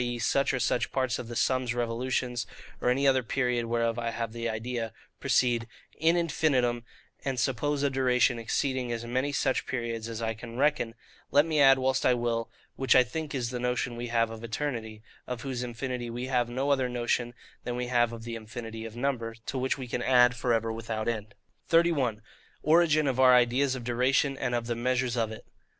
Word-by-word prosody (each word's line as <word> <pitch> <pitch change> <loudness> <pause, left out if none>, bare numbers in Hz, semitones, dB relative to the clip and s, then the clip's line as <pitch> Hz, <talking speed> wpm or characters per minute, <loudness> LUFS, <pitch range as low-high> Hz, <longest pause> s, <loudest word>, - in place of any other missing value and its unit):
e. 120 0 -2
such 135 +4 +1
or 130 - -1
such 125 - 0
parts 130 -2 0
of 120 - -6
the 120 - -7
sun's 130 -1 +1
revolutions, 120 +1 -1 0.3
or - - +2
any 135 +3 +2
other 130 -1 +4
period 125 -1 0
whereof 115 0 0
I 115 0 -1
have 115 -1 -4
the 115 0 -3
idea) 115 +1 -3 0.3
proceed 120 -2 +2 0.3
IN 165 +2 +3
INFINITUM, 130 -8 +1 0.4
and 135 -2 -2
suppose 140 +3 0
a 140 - +3
duration 125 -2 +2
exceeding 130 +2 -1
as 115 0 -3
many 130 +4 -1
such 135 -2 0
periods 115 -2 -3
as 115 -1 -5
I 110 -1 -1
can 115 +1 -9
reckon, 135 -5 +1 0.3
let 145 +2 +5
me 155 -2 0
add 135 -1 +7
whilst 130 0 +1
I 125 - +4
will, 115 -1 -1 0.3
which 135 -2 +3
I 130 - +8
think 150 +4 -5
is 120 -2 -2
the 125 - -3
notion 125 0 -1
we 120 +1 -4
have 115 -1 +1
of 115 0 -9
eternity; 110 -3 -4 0.2
of 125 -2 -4
whose 130 -3 -3
infinity 125 0 -4
we 120 +2 -4
have 125 -2 +1
no 135 +4 0
other 130 -3 +2
notion 120 0 -1 0.3
than 120 - -3
we 125 0 -2
have 120 -1 +2
of 115 -1 -8
the 115 0 -5
infinity 115 0 -7
of 110 0 -8
number, 120 -3 -2
to 130 - -3
which 130 +2 0
we 130 -2 -6
can 120 - -3
add 125 -1 +5
for 125 - -1
ever 115 -1 +1
without 110 -1 -4
end. 110 -2 -3 0.3
31. 145 -10 +2 0.4
Origin 155 -1 +4
of 130 -2 0
our 130 -1 +7
Ideas 125 +2 +3
of 125 - -6
Duration, 130 +3 +2
and 125 -2 -1
of 120 -1 -1
the 120 - -1
measures 125 +1 0
of 115 -2 0
it. 110 - -9
125 Hz, 205 wpm, -28 LUFS, 115-130 Hz, 0.4 s, I